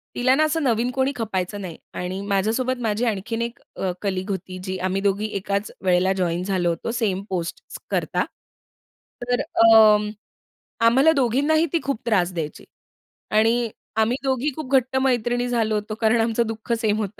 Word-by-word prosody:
तिला 255 +1 +3
ना 310 - +3
असं 310 +1 0
नवीन 240 -1 +1
कोणी 265 +1 +1
खपायचं 205 -3 -3
नाही. 175 -4 -7 0.2
आणि 185 +2 -4
माझ्यासोबत 225 +6 0
माझी 225 +1 0
आणखीन 225 +2 -2
एक 235 0 -4 0.2
अ, 190 - -1
कलीग 190 -1 -2
होती 185 -1 -5
जी 185 0 -3
आम्ही 185 +1 -1
दोघी 200 +1 +1
एकाच 200 +1 -2
वेळेला 185 +1 +3
जॉइन 175 -1 0
झालो 185 -3 0
होतो, 170 +7 -3
सेम 205 -5 -1
पोस्ट 175 -3 -3 0.3
करता. - - 0 1.0
तर 245 0 0
अं, 215 -2 +5 0.8
आम्हाला 265 +7 +5
दोघींनाही 280 +5 +2
ती 335 - +3
खूप 275 -5 -2
त्रास 190 -6 +1
द्यायची. 160 -3 -5 0.7
आणि 225 +2 +3 0.3
आम्ही 225 +4 +2
दोघी 265 +2 0
खूप 290 -4 -6
घट्ट 260 0 +2
मैत्रिणी 245 -1 +1
झालो 225 -3 +1
होतो 210 +1 -3
कारण 225 +1 +3
आमचं 230 0 +1
दुःख 225 +1 -6
सेम 215 -1 +1
होतं. 210 -1 -4
220 Hz, 165 wpm, -23 LUFS, 190-245 Hz, 1.0 s, अं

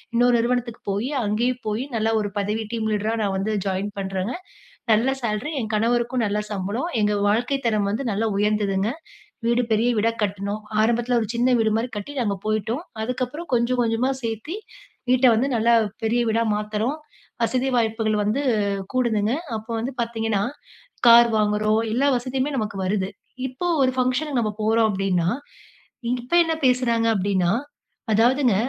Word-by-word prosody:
இன்னொரு 245 0 +4
நிறுவனத்துக்கு 240 0 -1
போயி 210 +7 -1 0.2
அங்கயும் 240 +4 0
போயி 215 +4 -1
நல்லா 225 0 +1
ஒரு 205 - -2
பதவி 210 +2 -1
டீம் 220 -1 -1
லீடரா 215 +2 0
நான் 195 -1 0
வந்து 215 +3 -1
ஜாயின் 195 +1 -2
பண்ணுறேங்க. 195 +3 -3 0.6
நல்ல 230 +5 +3
சேலரி, 220 +5 -2
என் 220 - -4
கணவருக்கும் 235 +2 +1
நல்ல 210 0 -1
சம்பளம், 205 - -2
எங்க 210 0 +2 0.2
வாழ்க்கை 245 +6 +1
தரம் 210 -3 +1
வந்து 250 +5 -2
நல்லா 210 +3 0
உயர்ந்ததுங்க. 205 -1 +1 0.6
வீடு 235 +1 +3
பெரிய 225 +3 +2
வீடா 225 +2 +2
கட்டுனோம். 200 +1 -2 0.2
ஆரம்பத்துல 240 +2 +2
ஒரு 220 - -2
சின்ன 250 +2 +3
வீடு 220 -1 +2
மாரி 235 +3 -2
கட்டி, 205 +8 -6
நாங்க 205 -4 0
போய்ட்டோம். 215 - -1 0.2
அதுக்கப்பறம் 255 +7 -4
கொஞ்சம் 240 +1 +1
கொஞ்சமா 230 +3 +1
சேத்தி, 230 - -4 0.5
வீட்டை 255 0 +5
வந்து 255 +5 +1
நல்லா 230 +1 +3 0.3
பெரிய 230 +2 +2
வீடா 230 +1 +2
மாத்துறோம், 215 +7 -2 0.5
வசதி 255 +3 +1
வாய்ப்புகள் 220 -2 +1
வந்து 220 +7 0 0.5
கூடுதுங்க. 225 -3 +1 0.2
அப்போ 220 +2 -9
வந்து 250 +4 -3
பாத்தீங்கன்னா, 225 -3 -1 0.6
கார் 235 0 +9
வாங்குறோம் 215 +1 +2
எல்லா 275 +4 +2
வசதியுமே 260 +3 -2
நமக்கு 210 -4 -3
வருது. 190 0 0 0.4
இப்போ 260 +8 -6 0.2
ஒரு 260 -1 +3
ஃபங்ஷனுக்கு 255 +2 +1
நாம 215 - -1
போறோம் 220 +1 +3
அப்டீன்னா, 185 -3 0 0.8
இ - - 0
இப்போ 250 +8 -2
என்ன 325 -1 0
பேசுறாங்க 245 -3 +2
அப்டீன்னா 190 -3 +1 0.6
அதாவதுங்க 240 +1 +3
225 Hz, 155 wpm, -23 LUFS, 210-245 Hz, 0.8 s, கார்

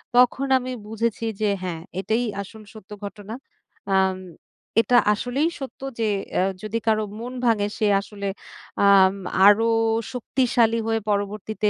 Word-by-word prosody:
তখন 250 +2 +4
আমি 255 0 -4 0.2
বুঝেছি 225 +1 -2 0.2
যে, 215 - +2 0.2
হ্যাঁ, 170 -3 -4 0.2
এটাই 220 +5 0 0.2
আসল 215 +2 -11
সত্য 210 -2 -14
ঘটনা। 205 +1 -8 0.6
আম 190 -1 +2 0.6
এটা 245 +1 +3 0.2
আসলেই 255 +9 -1
সত্য 270 - -8 0.2
যে 225 - +1 0.3
এ - - +3 0.2
যদি 215 +1 -3
কারো 215 -1 +3 0.2
মন 245 +2 -6
ভাঙে, 215 -3 +2
সে 220 - 0 0.2
আসলে 200 0 -7 0.6
আম 195 -1 +6 0.3
আরও 220 +3 +5 0.5
শক্তিশালী 240 -2 +1
হয়ে 225 0 +1
পরবর্তীতে 210 +1 -1
220 Hz, 135 wpm, -23 LUFS, 205-235 Hz, 0.6 s, আম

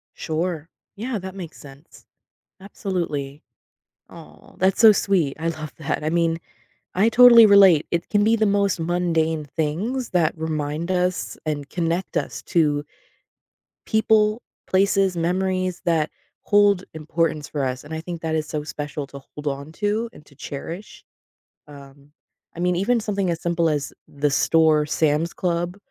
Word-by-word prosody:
Sure. 165 0 -3 0.3
Yeah, 225 +2 -3
that 190 0 -8
makes 175 -5 -9
sense. 140 +2 -15 0.6
Absolutely. 170 - -4 0.7
Aw, - - -15
that's 190 +1 +2
so 220 -2 +9
sweet. 185 -8 0
I 165 - -1
love 155 -2 -5
that. 155 0 -3
I 155 - 0
mean, 165 -1 +1 0.6
I 195 +4 +3
totally 235 -1 +8
relate. 195 -6 +6
It 170 0 -2
can 205 -1 +2
be 225 +2 +4
the 220 -1 +2
most 200 -2 +1
mundane 165 -2 0
things 170 - -2
that 170 -4 +2
remind 155 +1 -3
us 180 0 -1
and 145 -2 -3
connect 170 +1 -2
us - - -3
to 150 -4 +1 1.0
people, 220 0 +2 0.3
places, 195 -1 +2
memories 185 +1 -1
that 160 -3 +1 0.3
hold 205 -2 +3
importance 155 -1 -2
for 145 -2 -3
us, 130 -1 -3
and 150 +2 -9
I 160 - -4
think 170 0 -7
that 160 -1 -2
is 155 -1 -2
so 150 -1 -4
special 150 -1 -5
to 140 0 -10
hold 150 +2 -10
onto 185 +11 -2
and 150 - -16
to 140 - -21
cherish. 165 +8 -8 0.6
Um, 140 -1 -15 0.5
I - - -6
mean, 180 0 +1
even 230 +6 +1
something 200 -3 -1
as 165 -1 -4
simple 170 -1 +1
as 145 -3 -2 0.2
the 145 +1 -1
store 155 +1 +3
Sam's 155 +2 +1
Club, 175 0 -2
170 Hz, 150 wpm, -22 LUFS, 150-190 Hz, 1.0 s, so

